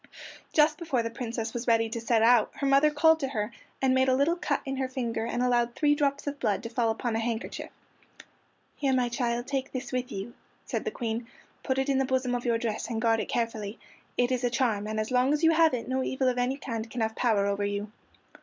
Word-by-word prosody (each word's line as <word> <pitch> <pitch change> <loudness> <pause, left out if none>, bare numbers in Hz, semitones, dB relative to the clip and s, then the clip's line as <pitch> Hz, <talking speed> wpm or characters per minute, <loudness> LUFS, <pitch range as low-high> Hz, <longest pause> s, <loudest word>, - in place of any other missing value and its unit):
Just 305 +4 +3
before 280 -9 0
the 230 - -3
Princess 230 -1 -4
was 240 0 -4
ready 225 -1 +3
to 225 +1 -4
set 225 -1 +2
out, 235 -2 +5
her 280 - -3
mother 275 +2 +5
called 320 +2 +4
her 270 - 0
to 265 - -8
her, 210 +1 -2 0.3
and 260 -1 +4
made 260 0 +3
a 255 - +4
little 285 +6 +2
cut 305 -5 -1
in 270 0 -3
her 260 -1 -1
finger, 230 -3 -2
and 240 +1 -1
allowed 240 -1 +1
three 295 -1 +3
drops 285 -1 0
of 285 -1 -4
blood 205 +2 0
to 230 - -5
fall 230 -1 +1
upon 225 +1 -1
a - - +1
handkerchief. 225 0 -3 1.1
"Here, 275 -2 0
my 250 -1 +1
child, 240 0 -1
take 270 0 -3
this 255 -1 -5
with 250 -1 -2
you," 195 +5 -5 0.3
said - - -3
the - - +1
Queen; 230 - -4 0.3
"put 260 - -1
it 265 +1 +1
in 270 -1 +2
the 270 - +2
bosom 260 -1 0
of 245 0 -2
your 235 -1 +2
dress, 225 -1 -3
and 225 -2 -2
guard 225 0 +2
it - - -3
carefully. 225 -3 -2 0.4
It 245 +1 +2
is 250 -1 0
a 245 - +2
charm, 230 -4 0
and 215 0 -2
as 215 +3 -2
long 255 +3 +3
as 300 +2 -1
you 325 - +6
have 320 -3 +4
it 235 - -5
no 260 +1 0
evil 260 0 0
of 250 0 -1
any 250 +2 0
kind 230 -5 -5
can 235 +1 -4
have 220 0 -1
power 215 -5 +2
over 200 0 0
you." 205 +1 -3
245 Hz, 250 wpm, -28 LUFS, 225-270 Hz, 1.1 s, you